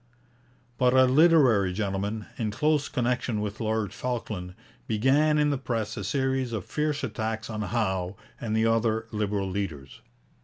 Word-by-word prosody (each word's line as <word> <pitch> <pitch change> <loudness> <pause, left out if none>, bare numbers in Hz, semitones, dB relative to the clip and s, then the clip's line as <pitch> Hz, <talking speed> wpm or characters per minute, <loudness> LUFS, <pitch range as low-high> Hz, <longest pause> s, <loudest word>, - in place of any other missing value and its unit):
But 125 0 +4
a 130 0 +7
literary 130 - +5
gentleman, 100 +2 -2
in 110 -2 -2
close 150 +6 +1
connection 125 -2 -1
with 105 0 -4
Lord 110 -2 -1
Falkland, 105 -7 -4 0.3
began 135 +8 +3
in 150 0 +3
the 140 - -1
press 115 -5 -2
a 105 - -5
series 130 +2 -1
of 105 -5 -3
fierce 150 -1 -1
attacks 110 +1 -3
on 110 -1 -3
Howe 95 -3 -1 0.2
and 110 -2 -1
the 110 - +3
other 115 0 +1
Liberal 105 -2 -1
leaders. 85 -8 -5
110 Hz, 150 wpm, -27 LUFS, 105-130 Hz, 0.3 s, a